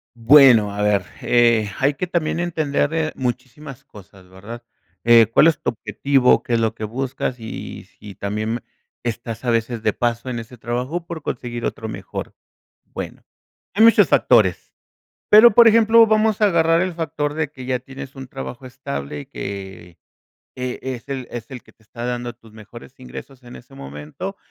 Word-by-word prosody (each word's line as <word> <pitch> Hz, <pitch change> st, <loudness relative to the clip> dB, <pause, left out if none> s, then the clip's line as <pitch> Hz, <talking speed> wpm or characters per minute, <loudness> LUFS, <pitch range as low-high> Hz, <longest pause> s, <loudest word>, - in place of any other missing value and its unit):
Bueno, 115 Hz, -4 st, +6 dB
a 105 Hz, -, -4 dB
ver, 100 Hz, -3 st, +1 dB, 0.2 s
eh, 115 Hz, -3 st, +3 dB
hay 135 Hz, +2 st, +2 dB
que 140 Hz, -, -3 dB
también 170 Hz, -1 st, -1 dB
entender, 155 Hz, -3 st, -1 dB
eh, 160 Hz, -1 st, -1 dB
muchísimas 130 Hz, +2 st, -6 dB
cosas, 95 Hz, -5 st, -16 dB
¿verdad?, 105 Hz, +6 st, -10 dB, 0.4 s
eh, 115 Hz, -1 st, +7 dB
¿cuál 150 Hz, -, +6 dB
es 155 Hz, -4 st, +2 dB
tu -, -, -1 dB
objetivo? 125 Hz, +4 st, +1 dB
¿Qué 120 Hz, -, -3 dB
es 115 Hz, -, +3 dB
lo 115 Hz, 0 st, 0 dB
que 110 Hz, -, -8 dB
buscas? 125 Hz, +2 st, -3 dB
Y 110 Hz, 0 st, -8 dB
si 105 Hz, -1 st, -13 dB
también 105 Hz, +4 st, -3 dB, 0.4 s
estás 115 Hz, 0 st, -5 dB
a -, -, 0 dB
veces 115 Hz, 0 st, -1 dB
de 110 Hz, -1 st, 0 dB
paso 120 Hz, +3 st, -2 dB
en 120 Hz, -, -3 dB
ese 115 Hz, +1 st, -9 dB
trabajo 125 Hz, +9 st, -4 dB
por 165 Hz, -3 st, -7 dB
conseguir 120 Hz, -2 st, -5 dB
otro 110 Hz, -, -4 dB
mejor. -, -, -7 dB, 0.5 s
Bueno, -, -, -8 dB, 0.5 s
hay 210 Hz, +4 st, +4 dB
muchos 220 Hz, -5 st, +6 dB
factores, 105 Hz, -8 st, +3 dB, 0.6 s
pero, 215 Hz, +1 st, +8 dB
por 235 Hz, -1 st, +8 dB
ejemplo, 225 Hz, 0 st, +6 dB
vamos 215 Hz, -1 st, +2 dB
a 210 Hz, -, +6 dB
agarrar 165 Hz, -2 st, +3 dB
el 185 Hz, -1 st, -2 dB
factor 150 Hz, -3 st, -3 dB
de 160 Hz, -1 st, -1 dB
que 130 Hz, -4 st, -10 dB
ya 125 Hz, -1 st, -1 dB
tienes 135 Hz, +2 st, -10 dB
un 135 Hz, -1 st, -9 dB
trabajo 135 Hz, -1 st, -8 dB
estable 75 Hz, -, -6 dB
y -, -, -12 dB
que 95 Hz, -3 st, -8 dB, 0.6 s
e 125 Hz, 0 st, -4 dB
es 130 Hz, 0 st, -6 dB
el 130 Hz, -2 st, -4 dB
es 115 Hz, -2 st, -7 dB
el 125 Hz, -2 st, -8 dB
que -, -, -20 dB
te -, -, -33 dB
está 120 Hz, +2 st, -8 dB
dando 120 Hz, -1 st, -4 dB
tus 115 Hz, -, -20 dB
mejores 110 Hz, +3 st, -13 dB
ingresos 130 Hz, +1 st, -11 dB
en 120 Hz, 0 st, -12 dB
ese 130 Hz, +3 st, -15 dB
momento 75 Hz, -, -8 dB
125 Hz, 180 wpm, -21 LUFS, 110-145 Hz, 0.6 s, pero